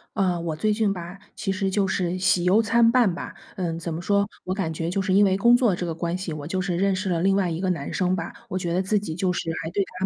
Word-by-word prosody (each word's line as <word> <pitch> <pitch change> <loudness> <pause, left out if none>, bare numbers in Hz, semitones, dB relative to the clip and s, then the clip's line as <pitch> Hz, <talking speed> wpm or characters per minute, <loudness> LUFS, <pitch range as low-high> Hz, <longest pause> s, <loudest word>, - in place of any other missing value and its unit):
啊， 180 -3 +1
我 165 -2 -3
最 215 +7 0
近 210 -1 +1
吧， 175 0 -8 0.2
其 195 - -2
实 195 0 -1
就 195 0 +1
是 185 -1 -1
喜 185 -1 +3
忧 190 +5 +4
参 230 +1 +4
半 230 -8 +3
吧。 - - -7 0.2
嗯， 170 -3 -3
怎 170 0 -4
么 160 - -3
说， 200 +3 +1 0.2
我 185 - -2
感 190 -5 -2
觉 165 +1 -3
就 195 - 0
是 190 - -1
因 200 +2 +5
为 190 -1 +2
工 235 +4 +5
作 235 -7 +2
这 175 0 -4
个 165 - -3
关 170 +1 -2
系， 185 -2 -4
我 150 -1 -6
就 185 +4 -2
是 180 -2 -1
认 195 +1 +2
识 185 +1 -2
了 170 -2 +1
另 195 0 +3
外 195 -3 +1
一 165 0 -3
个 190 - -1
男 145 -5 -4
生 185 0 +1
吧， 165 -2 -4 0.2
我 185 - -2
觉 175 -2 -2
得 180 - +2
自 205 +2 +1
己 165 -6 -5
就 180 +1 0
是 165 - -3
还 160 - -5
对 200 +3 +1
他 185 0 -4
185 Hz, 320 characters per minute, -24 LUFS, 170-200 Hz, 0.2 s, 因